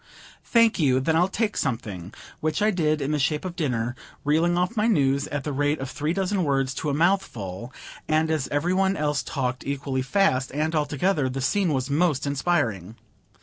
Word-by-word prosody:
"Thank 230 -3 +3
you; 130 -5 +3
then 160 +5 +1
I'll 175 +3 +4
take 210 +2 -1
something:" 105 -8 -3 0.3
which 155 +2 -1
I 215 +1 +3
did, 155 -5 +1
in 140 - -1
the 150 - 0
shape 150 +4 0
of 180 -2 -5
dinner, 120 -7 -1 0.3
reeling 165 +4 +2
off 180 +6 0
my 215 0 +2
news 140 -9 +2
at 145 -2 -3
the 150 - -3
rate 145 +2 +1
of 135 -1 -5
three 150 +1 -2
dozen 190 +1 0
words 135 -3 0
to 150 - -3
a - - 0
mouthful; 125 - -1 0.4
and 155 +1 +2
as 155 -4 0
every 155 +5 0
one 190 +1 +2
else 150 -1 0
talked 130 -3 -3
equally 135 -1 -2
fast, 130 -3 +1
and 155 +2 0
all 150 -2 +1
together, 145 -1 0
the 130 +1 -4
scene 170 +7 +1
was 135 -1 -1
most 150 -2 +1
inspiring. 140 - -1
150 Hz, 195 wpm, -25 LUFS, 135-175 Hz, 0.4 s, I'll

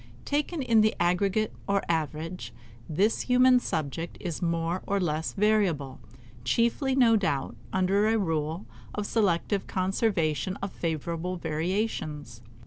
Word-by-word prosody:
Taken 295 +1 -1
in 230 -3 +4
the 215 0 +3
aggregate 195 +5 +1
or 200 0 +1
average, 160 -4 -3 0.3
this 195 +8 +2
human 250 0 +5
subject 160 - -3
is 170 -4 -4
more 170 +1 0
or 200 0 +1
less 160 -3 -1
variable; 195 -10 +1 0.4
chiefly, 235 - +1
no 240 -4 +5
doubt, 145 -10 0 0.2
under 195 +3 +2
a 225 +1 +3
rule 165 -2 -1 0.3
of 210 - -2
selective 200 -2 +1
conservation 185 - 0
of 195 -1 -4
favorable 170 +2 -3
variations. 160 - -3
185 Hz, 125 wpm, -28 LUFS, 160-215 Hz, 0.4 s, human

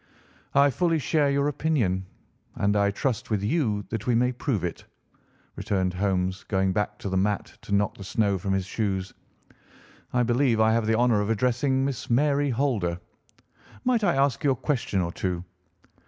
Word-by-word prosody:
"I 140 0 +5
fully 165 +3 +1
share 150 -1 +1
your 140 +1 +1
opinion, 120 - 0 0.5
and 100 +1 +1
I 100 0 +3
trust, 120 +3 -2
with 105 -3 0
you, 105 -5 0
that 110 0 -4
we 120 - +3
may 125 +2 +3
prove 125 - -2
it," 85 - -4 0.7
returned 95 -2 -1
Holmes, 95 -1 -1
going 95 -2 +1
back 105 +1 -1
to 100 - -5
the 95 - 0
mat 100 +1 -1
to - - -11
knock 100 0 +1
the - - -7
snow 100 0 0
from 95 +3 -3
his 95 -1 0
shoes. 95 -2 -2 1.0
"I 125 0 +2
believe 120 -1 +2
I 110 0 +4
have 115 -1 +1
the 110 0 +2
honour 120 -3 +3
of 105 - -2
addressing 125 +4 +1
Miss 135 -1 -4
Mary 140 +3 +2
Holder. 115 -10 0 0.8
Might 245 -3 +2
I 175 -8 +3
ask 135 -2 +1
you 145 - +3
a 135 - +3
question 120 -7 -1
or 85 -1 -2
two?" 90 -1 -3
110 Hz, 180 wpm, -26 LUFS, 100-135 Hz, 1.0 s, I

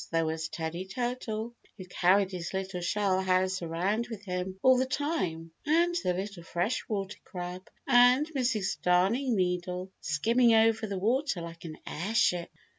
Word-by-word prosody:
There 165 -1 +2
was 160 0 -3
Teddy 165 +3 -4
Turtle, 235 0 -3 0.2
who 185 - -8
carried 185 +2 +3
his 180 0 -5
little 190 -1 -3
shell 190 +1 +1
house 185 0 +1
around 185 +8 -1
with 220 -4 -8
him 180 0 -3
all 260 0 +7
the 260 - +1
time, 220 - -2
and 340 +3 +3
the 180 - +1
little 195 -1 -5
Freshwater 195 +3 -2
Crab, 180 0 -7 0.2
and 250 +2 +6
Mrs. 240 -8 -1
Darning 205 +9 +2
Needle, 180 0 -1
skimming 230 +9 +3
over 220 0 +3
the 200 -1 -3
water 235 - 0
like 165 0 -9
an 155 -2 -7
airship. 180 -1 0
190 Hz, 150 wpm, -29 LUFS, 180-230 Hz, 0.2 s, all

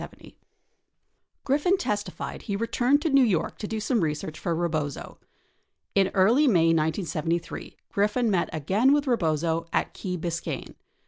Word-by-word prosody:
31 - - -11 1.1
Griffin 295 +8 +2
testified 210 - -4
he 200 - -3
returned 245 +6 +1
to 325 - +1
New 275 -1 +6
York 200 -9 0
to 210 - -4
do 220 +1 -3
some 220 +1 0
research 155 0 -3
for 170 -2 -1
Rebozo. 155 -4 -3 0.8
Tn 195 -1 +4
early 230 +10 +4
May 165 -8 +4
1973, 165 +1 -2
Griffin 210 +3 +1
met 180 -3 +1
again 195 - +2
with 290 0 +2
Rebozo 165 - 0
at - - -1
Key 180 -2 -4
Bisc 170 0 -4
ayne. - - -6
190 Hz, 145 wpm, -26 LUFS, 165-240 Hz, 1.1 s, New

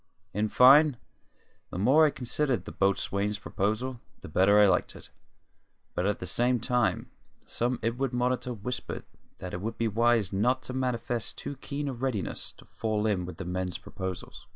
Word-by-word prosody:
In 105 +1 0
fine, 135 +4 +7 0.7
the - - -6
more 135 - +5
I - - +2
considered 125 -5 -1
the - - -7
boatswain's 100 +1 0
proposal, 110 +6 -2 0.2
the - - -8
better 95 +6 +5
I 105 - +8
liked 95 - +1
it; - - -12 0.8
but 90 - 0
at 105 - 0
the - - -6
same 120 +7 +1
time 125 0 0 0.3
some 120 +1 -1
inward 120 +3 0
monitor 125 0 0
whispered 125 +2 -5 0.3
that 90 - -7
it 90 - -4
would 110 +3 -4
be 115 - +1
wise 115 -2 +2
not 125 +6 +1
to 130 - -6
manifest 120 -3 -2
too 145 - -5
keen 145 +1 -4
a 135 - -2
readiness 125 -5 -3
to - - -18
fall 110 -1 -2
in 100 -5 +1
with 90 -3 -8
the 95 - -6
men's 90 0 -2
proposals. 95 -2 -7
115 Hz, 175 wpm, -28 LUFS, 100-125 Hz, 0.8 s, I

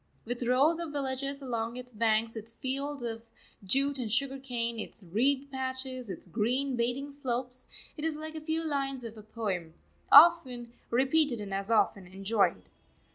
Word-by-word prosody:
With 240 +2 -3
rows 285 +7 +4
of 335 -3 -3
villages 275 0 -2
along 235 -1 -3
its 250 0 -8
banks, 225 +1 +1
its 220 +1 -3
fields 275 +1 -3
of 225 -1 -3 0.4
jute 275 +7 +1
and 230 -4 -3
sugar 270 +3 0
cane, 235 -3 -3
its 215 - -6
reed 265 +10 +1
patches, 260 -2 -4
its 185 - -5
green 245 +8 0
bathing 245 +4 -1
slopes, 255 -2 -3 0.3
it 300 - -6
is 320 -1 0
like 315 +1 -5
a 315 - -6
few 320 +1 -1
lines 275 -4 -1
of 230 -1 -7
a 215 - -10
poem, 195 -7 -4 0.4
often 270 -7 +7 0.2
repeated 265 +1 +2
and 200 -2 -5
as 195 +2 -1
often 205 -4 +2
enjoyed. 195 - +1
250 Hz, 165 wpm, -30 LUFS, 225-275 Hz, 0.4 s, often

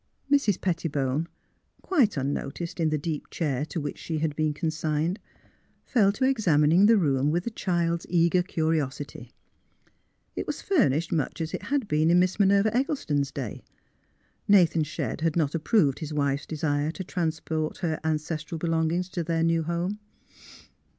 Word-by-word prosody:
Mrs. 275 -10 +3
Pettibone, 155 -4 -1 0.6
quite 265 - +2
unnoticed 145 +5 -3
in 160 -1 +2
the 155 - 0
deep 150 0 -4
chair 145 -5 -1
to 165 - -4
which 145 -2 -5
she 160 - -3
had 155 -1 -1
been 155 0 +1
consigned, 155 +3 -1 0.7
fell 210 -7 +3
to 260 +5 0
ex 260 -5 0
amining 160 +4 +5
the 225 0 +6
room 140 -6 +2
with 175 +3 0
a 235 - -2
child's 170 -4 -1
eager 170 +1 +3
curiosity. 155 -5 -2 1.0
It - - -4
was - - -3
furnished 170 - +1
much 155 -4 -1
as 160 0 -3
it - - -3
had 280 -5 -1
been 155 0 +2
in 175 - +5
Miss 185 +2 +2
Minerva 200 +2 +3
Eggleston's 155 - 0
day. 125 -7 -6 0.8
Nathan 175 -5 +5
Shedd 150 -3 -4
had 165 -1 +1
not 155 -4 +1
approved 165 - +2
his 155 -2 -5
wife's 140 -1 -1
desire 150 -2 -1
to 180 +4 -5
transport 160 -3 -2
her 160 -2 -1
an 160 -1 +1
cestral 155 +1 -5
belongings 165 +2 0
to 175 -2 -3
their 165 0 0
new 165 0 +2
home. 170 +5 -2
165 Hz, 160 wpm, -26 LUFS, 150-180 Hz, 1.0 s, the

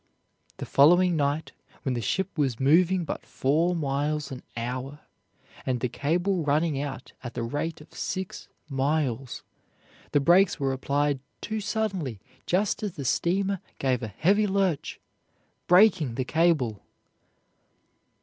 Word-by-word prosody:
The - - -5
following 175 +5 +5
night, 145 +1 0 0.3
when 130 - 0
the 120 - -2
ship 190 - -1
was 135 -7 0
moving 175 +6 +4
but - - -4
four 160 +6 +1
miles 145 -1 -1
an 130 - -6 0.2
hour 130 +5 -4 0.6
and 125 -2 -1
the 125 - -1
cable 175 - 0
running 145 0 +1
out 140 -2 -6
at 120 -1 -7
the 120 - -2
rate 145 +7 -3
of 150 - -16
six 190 -1 -4 0.2
miles, 135 -3 -1 0.7
the 145 - +4
brakes 175 +5 +4
were 135 -1 0
applied 140 +1 0 0.2
too 220 0 -3
suddenly 195 - -2 0.3
just 195 +3 +1
as 205 -4 -3
the 140 -5 -5
steamer 195 +7 +1 0.2
gave 130 -3 0
a 115 - -3
heavy 195 - +2
lurch, 190 -6 0 0.7
breaking 180 - +5
the 130 - -1
cable. 150 - +1
150 Hz, 135 wpm, -27 LUFS, 135-180 Hz, 0.7 s, following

